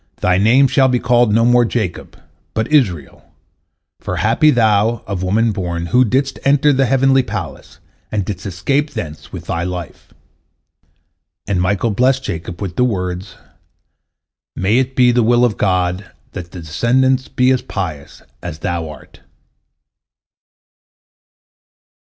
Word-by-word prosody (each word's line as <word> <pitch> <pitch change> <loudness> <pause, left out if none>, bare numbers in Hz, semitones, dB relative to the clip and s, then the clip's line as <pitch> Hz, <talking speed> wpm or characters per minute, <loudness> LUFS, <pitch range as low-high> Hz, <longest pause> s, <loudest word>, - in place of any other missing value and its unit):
Thy 90 0 +2
name 125 +7 +5
shall 135 +1 +3
be 125 -1 +1
called 120 -2 +2
no 115 +2 +3
more 120 0 +4
Jacob, 110 -6 -4 0.4
but 110 +1 0
Israel, 90 - 0 0.8
for - - -4
happy 115 +8 +3
thou, 110 -3 +2
of 95 -3 -4
woman 110 +5 +1
born, 85 -4 -3
who 125 +8 +3
didst 135 +4 -1
enter 145 +1 +3
the 135 -1 +2
heavenly 135 +1 +3
palace, 100 - -7 0.3
and 105 -3 -1
didst 100 0 -5
escape 135 - -1
thence 75 -3 -7
with - - -8
thy 85 - -2
life." 90 -3 -7 1.3
And 95 -3 -1
Michael 100 +5 0
blessed 130 +5 +1
Jacob 85 +1 -5
with 90 -3 -6
the 125 - +3
words, 95 -4 -3 1.2
"May 105 +6 +2
it 130 0 -2
be 125 -1 +5
the 120 0 +2
will 120 +2 +3
of 110 -4 0
God 90 -1 -1 0.2
that 85 -1 -8
thy 90 - -8
descendants 125 +11 +1
be 125 +1 +2
as 130 - +1
pious 80 -8 -6 0.2
as 85 -3 -6
thou 80 0 -3
art." 75 -3 -14
110 Hz, 140 wpm, -17 LUFS, 90-125 Hz, 1.3 s, name